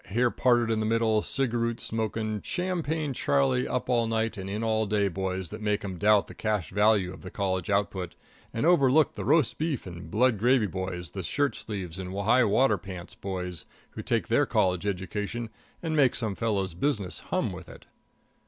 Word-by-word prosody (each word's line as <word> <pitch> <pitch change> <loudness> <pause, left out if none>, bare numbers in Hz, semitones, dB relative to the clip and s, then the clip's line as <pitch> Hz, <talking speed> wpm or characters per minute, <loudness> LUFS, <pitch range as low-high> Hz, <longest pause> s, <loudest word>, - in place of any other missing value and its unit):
hair 120 +4 +1
parted 120 -2 +2
in 110 - 0
the 110 - 0
middle, 110 -1 +2
cigaroot 115 -3 -1
smoking, 110 -1 -2
Champagne 165 -5 -2
Charlie, 130 -1 +1
up 125 - -2
all 120 -2 +2
night 115 0 0
and 95 -1 -6
in 105 +3 -3
all 110 -1 +1
day 100 0 +2
boys 95 -1 -3
that 110 +1 -7
make 105 -1 0
'em 95 -3 -5
doubt 105 +1 +4
the - - -11
cash 105 -5 -2
value 105 -2 +3
of 90 - -12
the - - -8
college 95 -3 -2
output, 95 -3 -1 0.4
and 115 - -1
overlook 155 -3 +4
the 105 - -5
roast 145 +4 +2
beef 155 -5 -1
and 85 -3 -8
blood 115 +2 +2
gravy 120 0 +4
boys, 95 -2 -4
the 95 - -5
shirt 145 - 0
sleeves 95 -5 -5
and 95 0 -5
high 120 +5 +4
water 120 +5 +3
pants 90 -2 -9
boys, 90 -3 -5 0.3
who - - -6
take - - 0
their - - +3
college 90 +1 +1
education 105 +4 -3 0.3
and 160 -2 -1
make 135 -5 +4
some 110 -4 -2
fellow's 100 -4 -1
business 95 - -1
hum - - 0
with - - -9
it. - - -13
110 Hz, 190 wpm, -28 LUFS, 95-125 Hz, 0.4 s, doubt